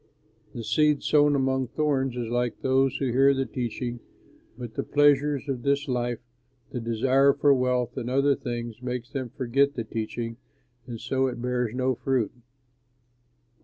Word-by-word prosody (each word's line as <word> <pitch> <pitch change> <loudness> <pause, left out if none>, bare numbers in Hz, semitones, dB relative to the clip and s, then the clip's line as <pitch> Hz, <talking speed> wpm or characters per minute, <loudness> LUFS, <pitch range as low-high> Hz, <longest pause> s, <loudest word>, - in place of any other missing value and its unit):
"The 115 - -5
seed 150 +3 +2
sown 145 -1 +4
among 130 -1 +1
thorns 135 -3 0
is 120 -2 -3
like 120 0 -1
those 135 0 +2
who 135 -3 -1
hear 135 +3 +4
the 135 0 0
teaching 120 0 -4 0.6
but 120 -3 -7
the - - -2
pleasures 145 -1 +2
of 130 -3 -2
this 140 +3 0
life, 120 -2 -1 0.5
the 125 - -3
desire 130 +4 +3
for 145 0 +4
wealth 125 -2 0
and 120 - -3
other 140 +2 +3
things 120 -2 -5
makes 125 0 -4
them 130 -3 -4
forget 140 +3 +1
the 115 - -2
teaching, 115 +1 -4 0.5
and 120 -2 -6
so 130 +2 0
it 125 -2 -4
bears 125 -1 -1
no 130 0 +1
fruit. 130 -2 -1
130 Hz, 160 wpm, -26 LUFS, 120-140 Hz, 0.6 s, sown